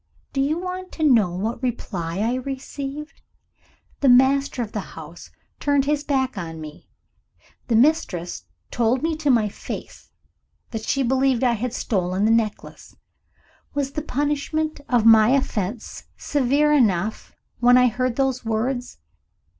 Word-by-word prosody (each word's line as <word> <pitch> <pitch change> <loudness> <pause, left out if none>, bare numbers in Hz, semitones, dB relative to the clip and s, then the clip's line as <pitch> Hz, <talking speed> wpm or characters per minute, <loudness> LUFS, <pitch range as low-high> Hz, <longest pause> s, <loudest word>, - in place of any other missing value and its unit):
Do 270 - 0
you 295 +4 +1
want 370 +1 -5
to 320 - -4
know 235 -11 +5
what 210 +7 -3
reply 190 -8 -3
I 230 +3 +1
received? 275 +3 -6 0.8
The 275 - +3
master 265 0 +4
of 215 - -8
the - - -3 0.2
house - - -10 0.3
turned 285 -2 +2
his 295 0 0
back 265 -6 -1
on 165 -2 -6
me; 155 0 -11 0.8
the 230 - +1
mistress 220 - +1 0.3
told 240 +3 +1
me 325 0 0
to 305 -2 -1
my 230 -5 +4
face 200 - -8 0.6
that 225 -2 -4
she 275 - +1
believed 265 0 +2
I 250 - +4
had 235 +2 -2
stolen 190 -4 -1
the 220 - +3
necklace. 225 -2 -2 0.8
Was 280 -1 -1
the 300 - -3
punishment 295 +2 -2
of 240 -3 +2
my 225 +2 +7
offense 215 -3 -4
severe 290 +2 +2
enough, 215 -6 +1 0.2
when 245 +1 +6
I 250 - +6
heard 250 +1 -1
those 265 -1 0
words? 245 +3 -2
250 Hz, 145 wpm, -23 LUFS, 220-280 Hz, 0.8 s, my